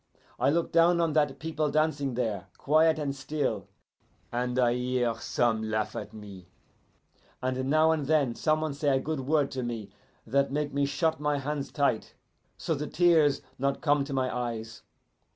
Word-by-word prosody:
I 130 +3 +3
look 165 +3 0
down 170 +1 +4
on 165 -2 +1
that 145 -3 +2
people 155 0 -2
dancing 145 -3 0
there, 105 -6 -2
quiet 155 +2 +3
and 140 -3 -2
still, 145 +2 -2 0.6
and 125 +1 -2
I 120 -2 +3
hear 125 -1 0
some 115 -2 0
laugh 110 0 -1
at 105 - -5
me, 100 -4 -11 0.9
and 130 +1 -2
now 155 +2 +4
and 150 -4 -1
then 145 -6 +2
some 155 +5 +1
one 155 -2 -2
say 140 -2 +1
a - - 0
good 155 +2 -3
word 145 +1 +1
to 130 - -3
me 115 -5 -5 0.3
that 140 +4 +1
make 145 0 -2
me 140 0 +1
shut 160 +2 0
my 150 -1 0
hands 140 0 -3
tight, 140 -6 0 0.4
so 165 - -1
the 150 0 -3
tears 160 -5 +3 0.2
not 140 +1 0
come 145 -2 +3
to 140 - -8
my 130 -2 -1
eyes. 115 -2 -4
140 Hz, 175 wpm, -28 LUFS, 125-155 Hz, 0.9 s, down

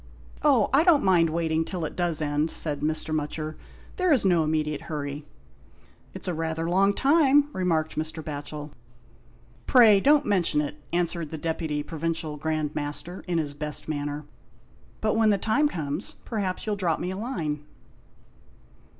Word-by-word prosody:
" - - -23
Oh, 270 -8 +3
I 285 +4 +6
don't 335 -5 +5
mind 175 -4 +4
waiting 160 0 0
till 175 -1 -4
it - - -6
does 170 -3 0
end," 150 +2 0
said 150 -3 +1
Mr. 155 +1 0
Mutcher, 155 +1 -3 0.2
" - - -23
there 365 -2 +2
is 260 -9 +4
no 175 -4 +4
immediate 155 -1 -2
'urry." 145 -1 -4 0.9
"It's - - -6
rather 165 -1 -2
a 170 - -2
long 195 +2 +3
time," 290 0 +4
remarked 165 -4 0
Mr. 160 +1 -3
Batchel. 150 0 -6 1.0
"Pray 225 -6 +7
don't 290 +6 +4
mention 180 -7 +2
it," 150 0 -3
answered 170 -2 -1
the 160 - -5
Deputy 160 -2 -2
Provincial 160 0 -3
Grand 155 0 -2
Master, 150 +5 -5
in 175 -1 0
his 150 -3 -2
best 150 +1 -4
manner. 145 -1 -3 0.8
"But 215 0 +1
when 220 -1 +4
the 205 - +3
time 225 +10 +2
comes, 155 - -4
perhaps 200 -5 -3
you'll 215 -1 -1
drop 175 -5 0
me 180 - -3
a - - -4
line." 160 - -3
165 Hz, 165 wpm, -26 LUFS, 150-195 Hz, 1.0 s, Pray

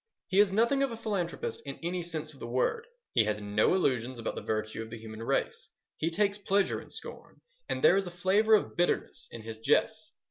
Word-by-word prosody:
He 195 +1 +3
is 205 -2 +6
nothing 235 +7 +3
of 275 -2 +1
a 230 - -5
philanthropist 225 - -3
in - - -6
any 175 +1 -1
sense 155 -2 -5
of 135 - -17
the - - -6
word. 130 - 0 0.3
He 110 - +4
has 105 0 -1
no 105 - +2
illusions 130 -8 0
about 115 - -3
the - - -5
virtue 110 0 -2
of 110 - -7
the 115 - -7
human 110 0 -9
race. 115 - -1 0.3
He 160 - -1
takes 200 +4 +1
pleasure 200 0 +1
in - - -15
scorn, - - -10 0.3
and - - -2
there 460 - +7
is 195 -2 0
a - - -3
flavour 195 +5 +4
of 210 - -1
bitterness 175 0 0
in 115 - -9
his 110 0 -7
jests. 115 - +1
175 Hz, 220 wpm, -30 LUFS, -, 0.3 s, there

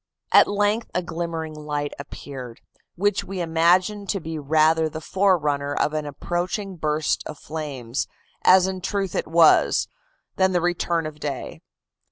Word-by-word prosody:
"At - - +7
length 205 +2 0
a 180 - +1
glimmering 165 -2 -4
light 150 -1 -4
appeared, 130 -4 -8 0.3
which 205 +2 +1
we 195 -1 -6
imagined 180 +5 +2
to 195 - 0
be 160 -2 -5
rather 155 +2 +3
the 155 - -6
forerunner 150 -6 +1
of 150 - +1
an 155 -1 -2
approaching 175 +6 -3
burst 155 -1 0
of 155 - -8
flames, 140 -6 -4 0.4
as 185 0 +7
in 190 -1 -3
truth 195 -1 -2
it - - -2
was, 165 0 +5 0.5
than 190 0 +3
the 175 - +3
return 175 -1 0
of 155 -1 -7
day. 140 -4 -5
160 Hz, 150 wpm, -23 LUFS, 150-185 Hz, 0.5 s, At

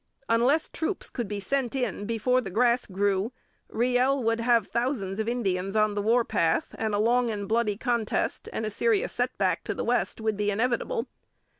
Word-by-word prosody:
Unless 245 +7 +3
troops 360 +4 -3
could 240 -4 -3
be 205 0 -4
sent 260 +5 -1
in 215 -6 -2
before 230 +3 +1
the 205 - -6
grass 240 +5 +2
grew, 200 +2 0 0.4
Riel 250 +3 +1
would 225 0 +1
have 230 -3 +3
thousands 230 -5 -2
of 220 +1 0
Indians 195 -5 -1
on 215 -1 +3
the 205 - -1
war 230 +3 +3
path, 165 -7 0
and 220 -2 0
a - - 0
long 240 +2 +3
and 205 -2 -3
bloody 220 -2 +1
contest 235 -3 -1
and 220 - -3
a 215 - -2
serious 450 - +1
setback - - 0
to - - -2
the - - -3
West - - 0
would 220 -2 -1
be 205 0 0
inevitable. 250 - 0
230 Hz, 185 wpm, -27 LUFS, 205-250 Hz, 0.4 s, Unless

